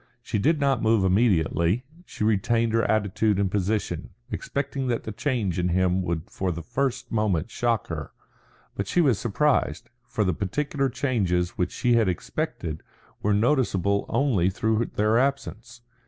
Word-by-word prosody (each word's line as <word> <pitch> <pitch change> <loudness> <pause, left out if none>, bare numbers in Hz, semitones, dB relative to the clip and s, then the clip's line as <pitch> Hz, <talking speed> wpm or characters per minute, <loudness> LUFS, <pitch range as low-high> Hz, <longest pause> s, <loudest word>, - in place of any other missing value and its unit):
She 110 - -2
did 155 +8 +2
not 140 -1 +2
move 110 -2 +3
immediately; 95 0 +2 0.2
she - - -5
retained 110 +2 +2
her 115 - +3
attitude 105 -1 +1
and 100 -2 0
position, 100 -4 -1 0.2
expecting 140 -1 -3
that 120 -2 -1
the 110 - -5
change 110 - -1
in 90 0 +1
him 90 +1 +2
would 85 -3 -2
for 95 -1 -2
the 85 -1 -5
first 125 - -2
moment 105 -3 0
shock 120 -3 0
her. 80 -4 -5 0.6
But - - -3
she - - +1
was 135 - +3
surprised; 130 +6 0 0.2
for 105 - -1
the 90 -2 +1
particular 135 - -1
changes 100 -9 0
which 90 -1 -2
she 125 -2 +1
had 110 -4 +3
expected 80 -2 -3 0.4
were 105 0 +2
noticeable 100 - +1
only 110 -11 +2
through 110 +4 0
their 110 +2 +3
absence. 120 - -2
110 Hz, 155 wpm, -25 LUFS, 95-120 Hz, 0.6 s, move